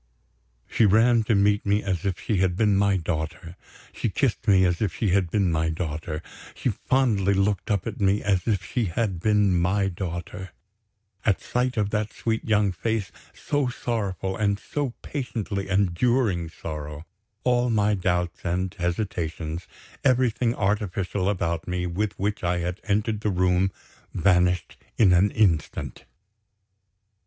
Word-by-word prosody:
She 110 - +3
ran 115 +3 +5
to 110 - +2
meet 100 +1 +3
me 100 +1 +1
as 95 -3 -2
if 95 -3 -2
she 105 - -1
had 90 -1 +2
been 105 -2 +3
my 100 0 +3
daughter; 85 +1 -4 0.4
she - - -2
kissed - - -1
me 95 -2 +5
as 90 -1 0
if 95 -7 0
she 110 - 0
had 95 -1 +2
been 95 -1 +1
my 80 0 +1
daughter; 80 -1 -4 0.3
she - - -1
fondly 105 -7 +1
looked 100 0 0
up 100 -3 0
at 110 -2 -5
me 100 +1 +2
as 95 -1 +1
if 100 -6 0
she 120 +5 -1
had 95 0 -1
been 105 -1 +3
my 95 +3 +1
daughter. 90 0 -6 0.7
At 100 -4 +3
the - - -21
sight 125 0 0
of 105 -1 0
that 105 0 -1
sweet 115 -1 -2
young 105 -2 +2
face, 105 +1 -2 0.2
so 145 -2 -1
sorrowful, 100 -6 -2
and 100 -1 +1
so 135 +3 -3
patiently 110 -8 -4
enduring 95 -1 +1
sorrow, 75 -1 -7 0.4
all 125 0 +2
my 105 -2 +2
doubts 90 -3 -1
and 90 +1 -1
hesitations, 85 -3 -3 0.4
everything 125 -2 +2
artificial 100 -1 -1
about 85 -4 -1
me 90 0 -2
with 95 +4 -2
which 100 +1 -2
I 90 0 +1
had 90 +3 -3
entered 105 +1 0
the 105 - 0
room, 90 0 +2 0.4
vanished 90 -2 +2 0.2
in 95 -5 +5
an 90 +4 +4
instant. 90 -9 0
95 Hz, 155 wpm, -25 LUFS, 90-105 Hz, 0.7 s, ran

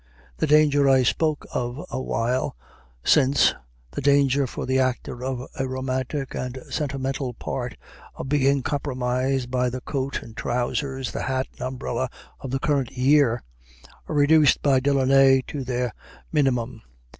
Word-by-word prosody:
The - - 0
danger 145 -2 +5
I 130 -1 +5
spoke 155 +4 0
of 125 +7 -3
a - - -2
while 125 - -1 0.5
since 140 -2 +4 0.4
the - - -4
danger, 140 -1 +3
for - - -5
the 130 +1 +1
actor 125 -1 -1
of 130 -1 -3
a 135 - 0
romantic 130 +1 -3
and 125 0 -4
sentimental 135 -3 -2
part, 125 0 -4 0.4
of - - -6
being 140 -1 +2
compromised 130 -2 -1
by 125 -1 +1
the 130 +1 -5
coat 135 +1 -3
and 115 - -12
trousers, 130 +2 -2
the - - -4
hat 130 +1 -1
and - - -17
umbrella 130 0 -3 0.3
of 135 - -6
the 135 - 0
current 135 -3 0
year 130 -2 +3 0.6
are - - -3
reduced 145 0 +5
by 135 -2 +4
Delaunay 135 -1 +4
to 140 -2 -5
their 125 -2 -2 0.4
minimum. 130 -6 0
130 Hz, 145 wpm, -24 LUFS, 125-140 Hz, 0.6 s, danger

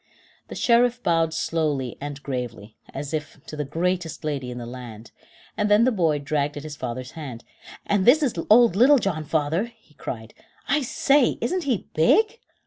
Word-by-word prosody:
The - - -8
Sheriff 245 +1 +3
bowed 165 -1 +2
slowly 150 -6 -1
'and 145 0 -6
gravely, 120 -5 -5 0.2
as 140 +2 -6
if 155 -1 -4
to - - -8
the 150 - -2
greatest 165 +2 -2
lady 140 -4 -3
in 125 - -6
the 120 - -6
land, 120 -2 -9 0.4
and 210 -1 0
then 210 +2 +5
the 255 - +4
boy 165 -8 +1
dragged 145 0 -2
at 145 - -6
his 155 -1 -7
father's 130 0 -5
hand. 135 -8 -8 0.4
"And 205 -2 +1
this 285 +9 +6
is 260 - +1 0.2
old 230 -3 +6
Little 265 +7 +6
John, 180 -10 -1
father," 155 +5 0
he 225 -9 -20
cried. 110 -5 -7 0.3
"I 300 - +2
say, 275 0 +2
isn't 340 +8 -1
he 250 -8 -1
big!" 430 - +3
160 Hz, 180 wpm, -24 LUFS, 140-230 Hz, 0.4 s, this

